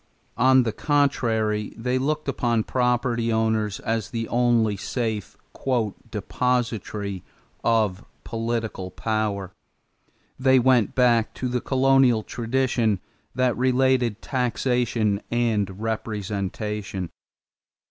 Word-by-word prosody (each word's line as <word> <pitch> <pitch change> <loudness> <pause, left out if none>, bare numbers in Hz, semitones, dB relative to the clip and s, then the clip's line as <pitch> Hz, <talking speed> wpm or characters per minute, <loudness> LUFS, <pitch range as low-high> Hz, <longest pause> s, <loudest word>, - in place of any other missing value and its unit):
On 130 +1 +6
the 115 - -1
contrary 110 -6 0
they 125 +3 0
looked 150 +3 -1
upon 120 -4 +1
property 120 -2 0
owners 110 -2 0
as 110 -2 -2
the 115 -1 -3
only 120 -3 +2
safe 110 0 -3 0.7
"depositary" 110 -6 -2 0.4
of 110 -4 +1 0.2
political 115 -4 -3
power. 105 -1 -2 0.9
They 130 0 +5
went 125 -4 +3
back 120 -3 +3
to 130 - -3
the 125 0 -1
colonial 130 -4 +3
tradition 120 -4 0 0.4
that 130 -2 +2
related 125 -3 +2
taxation 120 -4 0
and 105 -5 0
representation. 105 -3 -3
115 Hz, 95 wpm, -24 LUFS, 105-125 Hz, 0.9 s, On